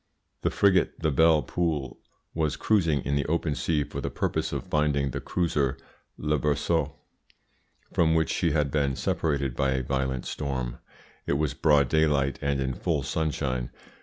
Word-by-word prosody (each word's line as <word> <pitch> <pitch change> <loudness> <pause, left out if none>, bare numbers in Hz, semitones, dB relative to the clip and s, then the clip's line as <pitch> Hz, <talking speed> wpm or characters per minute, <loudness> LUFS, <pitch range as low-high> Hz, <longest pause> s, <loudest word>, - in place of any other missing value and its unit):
The - - +1
frigate, 95 -3 +2
the 80 -2 +1
Belle 80 +1 +4
Poule, 75 -2 -2 0.3
was 80 -2 0
cruising 85 -10 +2
in 70 - -1
the 70 - 0
open 80 -1 0
sea 75 +1 0
for - - -6
the - - -2
purpose - - -1
of - - -3
finding 70 -2 +1
the - - -4
cruiser 75 -6 0 0.4
Le 75 0 0
Berceau, 75 +1 0 1.0
from 80 -1 +3
which 80 -2 +2
she 85 - +1
had 75 -2 +1
been 70 -2 +1
separated 70 -4 -1
by 65 -1 +1
a 65 -1 -1
violent 65 -1 -2
storm. 65 -4 -3 0.5
It - - +1
was 70 -1 0
broad 75 -3 +3
daylight 75 -2 +2
and 70 -1 0
in 65 -1 -1
full 75 +1 -1
sunshine. 70 -4 -1
75 Hz, 165 wpm, -27 LUFS, 70-80 Hz, 1.0 s, Belle